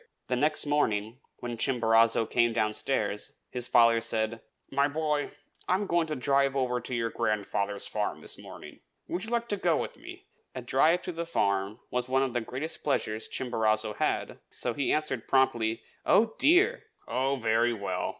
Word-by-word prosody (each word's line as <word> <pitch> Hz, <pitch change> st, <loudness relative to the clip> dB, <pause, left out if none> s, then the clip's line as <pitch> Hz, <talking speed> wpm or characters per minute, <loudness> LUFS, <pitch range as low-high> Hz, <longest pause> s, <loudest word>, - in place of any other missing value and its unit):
The 125 Hz, -, +1 dB
next 150 Hz, +5 st, +1 dB
morning, 115 Hz, -6 st, 0 dB, 0.2 s
when 120 Hz, -1 st, -4 dB
Chimborazo 115 Hz, -3 st, +3 dB
came 120 Hz, -1 st, +2 dB
downstairs, 110 Hz, -1 st, -1 dB, 0.2 s
his 125 Hz, -1 st, -3 dB
father 115 Hz, -2 st, +5 dB
said, 115 Hz, 0 st, -1 dB, 0.3 s
"My 140 Hz, +1 st, +3 dB
boy, 150 Hz, 0 st, -1 dB, 0.4 s
I 185 Hz, -, +3 dB
am 200 Hz, +2 st, -1 dB
going 170 Hz, -3 st, +1 dB
to 155 Hz, -, -3 dB
drive 135 Hz, +1 st, +2 dB
over 125 Hz, -2 st, 0 dB
to 125 Hz, -, -5 dB
your 115 Hz, -1 st, -1 dB
grandfather's 100 Hz, -1 st, -1 dB
farm -, -, -3 dB
this -, -, -7 dB
morning; -, -, -11 dB, 0.3 s
would 180 Hz, +4 st, -3 dB
you -, -, -6 dB
like 235 Hz, 0 st, -1 dB
to 205 Hz, -, 0 dB
go 175 Hz, -4 st, +2 dB
with -, -, -4 dB
me?" -, -, -11 dB, 0.3 s
A 130 Hz, -, -5 dB
drive 155 Hz, +8 st, +3 dB
to -, -, -4 dB
the 170 Hz, 0 st, -5 dB
farm 100 Hz, -5 st, 0 dB
was 125 Hz, 0 st, -1 dB
one 135 Hz, +1 st, +3 dB
of 130 Hz, -3 st, -2 dB
the 120 Hz, -, 0 dB
greatest 130 Hz, +8 st, -5 dB
pleasures 110 Hz, -6 st, -1 dB
Chimborazo 110 Hz, -4 st, 0 dB
had, -, -, -1 dB
so 120 Hz, -, -1 dB
he 140 Hz, +1 st, -1 dB
answered 150 Hz, -6 st, -1 dB
promptly, 120 Hz, -4 st, +2 dB, 0.2 s
"Oh, 220 Hz, +1 st, +3 dB
dear!" 430 Hz, -, +4 dB, 0.2 s
"Oh, 130 Hz, +3 st, 0 dB
very 115 Hz, -1 st, +2 dB
well!" 100 Hz, -5 st, -3 dB
125 Hz, 175 wpm, -28 LUFS, 115-150 Hz, 0.4 s, father